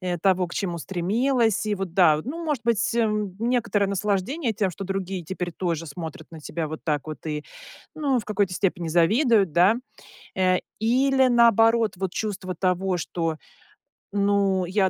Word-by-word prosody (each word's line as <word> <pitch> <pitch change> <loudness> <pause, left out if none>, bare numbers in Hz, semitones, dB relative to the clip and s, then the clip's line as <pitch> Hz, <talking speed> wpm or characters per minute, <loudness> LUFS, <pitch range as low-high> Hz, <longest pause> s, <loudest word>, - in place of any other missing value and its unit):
э, 180 -2 -2
того, 185 0 +2
к - - -9
чему 175 -4 -2
стремилась? 220 - 0
И, 210 -1 0
вот 190 -3 -5
да, 160 -5 +5
ну, 325 +7 -5
может 290 -8 -2
быть, 235 +1 +1
м, 210 -4 0
некоторое 230 -3 +1
наслаждение 205 - -1
тем, 200 -2 0
что 195 - -8
другие 195 -1 -3
теперь 180 +1 -5
тоже 170 -1 -3
смотрят 160 +1 -7
на 160 - -9
тебя 160 +2 -4
вот 155 +1 -6
так 150 -2 -1
вот 155 - -8
и, 150 -1 -3 0.5
ну, 275 -5 +1
в 220 - -5
какой-то 205 -3 0
степени 175 -2 -1
завидуют, 200 - +3
да. 180 +7 +5 0.6
Э, 185 -1 +3 0.2
или, 265 +4 +3
наоборот, 230 -2 +4
вот, 190 -1 -3
чувство 190 -4 -3
того, 185 0 0
что, 165 -2 -3 0.7
ну, 200 -2 +1
я 190 +1 +1
195 Hz, 165 wpm, -24 LUFS, 175-225 Hz, 0.7 s, да